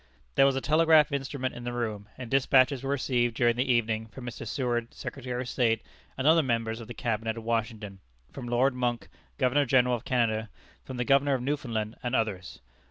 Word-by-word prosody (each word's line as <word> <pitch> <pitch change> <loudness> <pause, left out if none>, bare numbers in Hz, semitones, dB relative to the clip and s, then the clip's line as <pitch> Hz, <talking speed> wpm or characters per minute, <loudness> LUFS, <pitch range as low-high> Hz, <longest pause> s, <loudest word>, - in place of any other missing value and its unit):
There 135 - +5
was 135 - +1
a 135 - -1
telegraph 155 0 +4
instrument 135 -1 -3
in 120 - -8
the 120 0 -4
room, 110 -4 -4
and 125 -3 -8
despatches 135 0 +4
were 135 - -4
received 125 -4 0
during 120 0 +3
the 125 +2 +1
evening 110 -2 0
from 125 +3 -10
Mr. 115 -1 -7
Seward, 120 -2 -2
Secretary 125 -2 -5
of 125 - -4
State, 115 -3 +1 0.3
and 130 - -2
other 160 +2 +6
members 115 -4 -1
of 115 - -9
the 120 - -8
Cabinet 110 -1 -2
at 115 - -7
Washington, 110 -3 -3 0.3
from 125 -3 -7
Lord 125 +3 +2
Monck, 120 -2 -2 0.3
Governor 140 +1 +2
General 125 0 +4
of 120 -1 -2
Canada, 115 -3 0 0.3
from 130 - -7
the 125 - -1
Governor 140 +1 +3
of 125 - -3
Newfoundland, 120 -6 -2
and 125 0 -2
others. 100 -6 -2
120 Hz, 200 wpm, -28 LUFS, 115-135 Hz, 0.3 s, other